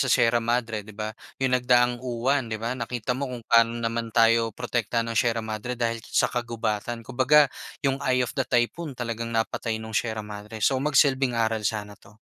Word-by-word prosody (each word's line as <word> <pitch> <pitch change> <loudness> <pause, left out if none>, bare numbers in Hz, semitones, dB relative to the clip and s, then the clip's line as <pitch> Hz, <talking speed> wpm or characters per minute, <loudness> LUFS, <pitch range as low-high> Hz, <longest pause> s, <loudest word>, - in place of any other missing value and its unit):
sa 130 - +1
Sierra 120 0 +4
Madre 115 -2 -1
'di 105 0 -13
ba, 110 0 -4 0.2
yung 130 -1 0
nagdaang 125 -1 +3
Uwan 125 +1 0
'di 110 - -2
ba, 115 +3 -3
nakita 125 -1 -3
mo 135 +2 -3
kung 125 -2 -7
paano 115 0 +4
naman 115 0 -2
tayo 115 -1 +3
protektahan 115 0 -1
ng 110 - 0
Sierra 115 -2 +1
Madre 110 +3 -4
dahil 115 -1 -1
sa - - 0
kagubatan. 115 -1 -3
Kumbaga, 130 +4 +5 0.4
yung 135 0 +1
eye 125 -1 +2
of - - -6
the 135 - -1
typhoon, 130 +4 0
talagang 115 -1 -3
napatay 115 0 -1
nung 110 0 -8
Sierra 110 +1 -1
Madre. 105 +1 -6
So, 130 -1 +2
magsilbing 135 -3 +3
aral 110 -1 +1
sana 105 -1 -5
'to. 100 - -19
115 Hz, 190 wpm, -25 LUFS, 110-125 Hz, 0.4 s, Kumbaga